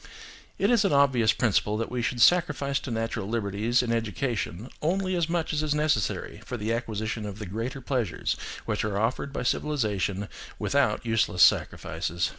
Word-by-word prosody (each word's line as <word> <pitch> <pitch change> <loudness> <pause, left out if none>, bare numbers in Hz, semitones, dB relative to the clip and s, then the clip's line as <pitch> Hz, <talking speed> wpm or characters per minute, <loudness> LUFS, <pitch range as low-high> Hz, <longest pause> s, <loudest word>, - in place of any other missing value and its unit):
It - - +2
is 235 -3 +4
an 195 - +2
obvious 135 -6 +4
principle 105 -2 +1
that 115 +2 -3
we 125 -1 -1
should 120 +1 -1
sacrifice 145 -5 +3
to - - -7
natural 115 -4 -2
liberties 110 +2 0
in 120 - -1
education 115 -2 -2
only 185 +3 0
as 170 -2 0
much 165 -2 -1
as 150 - +1
is 150 -1 0
necessary 150 -9 0
for 125 - -5
the 110 +1 -1
acquisition 110 -1 -3
of 100 -1 -6
the 105 - -6
greater 115 +8 -4
pleasures 125 -8 -1 0.3
which - - -1
are 105 -2 -1
offered 115 +6 -1
by 135 - -3
civilisation 105 -9 -1 0.3
without 140 -6 +1
useless 115 -6 +3
sacrifices. 85 0 +1
115 Hz, 170 wpm, -27 LUFS, 105-140 Hz, 0.3 s, is